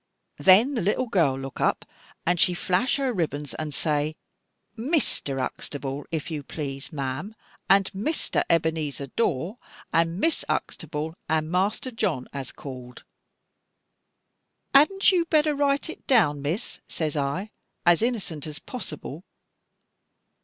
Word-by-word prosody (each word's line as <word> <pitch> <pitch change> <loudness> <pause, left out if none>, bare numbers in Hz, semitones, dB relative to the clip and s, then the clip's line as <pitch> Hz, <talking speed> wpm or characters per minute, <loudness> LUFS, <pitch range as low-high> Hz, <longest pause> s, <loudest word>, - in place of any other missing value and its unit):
Then 210 +9 +6
the 240 - 0
little 205 +7 +1
girl 165 - +2
look 135 0 -6
up - - +1 0.4
and 175 0 +2
she 180 +1 +4
flash 185 +9 +1
her 270 -3 0
ribbons 150 - -2
and 155 -1 -4
say, 150 0 0 0.6
'Mr. 235 - +1
Huxtable, 140 +1 -4
if 165 0 -3
you 150 -2 -2
please, 140 0 -6
ma'am, 145 +8 -4 0.3
and 195 0 +5
Mr. 220 +12 0
Ebenezer 160 -4 +1
Dawe, 180 - 0 0.4
and 165 +2 +2
Miss 325 +6 +2
Huxtable, 155 -1 -2 0.2
and 155 0 +1
Master 200 +8 0
John, 165 - -1
has 135 -2 -5
called.' 125 -3 -9 1.7
'Hadn't 390 +9 +6
you 350 -3 +3
better 305 -2 +3
write 280 +1 +1
it 325 - -9
down, 160 - +4
Miss?' 165 - -3
says 155 -2 -2
I, 150 +9 -1 0.3
as 175 +1 +5
innocent 200 - -1
as 150 -1 -6
possible. 165 - -7
165 Hz, 130 wpm, -26 LUFS, 145-225 Hz, 1.7 s, Then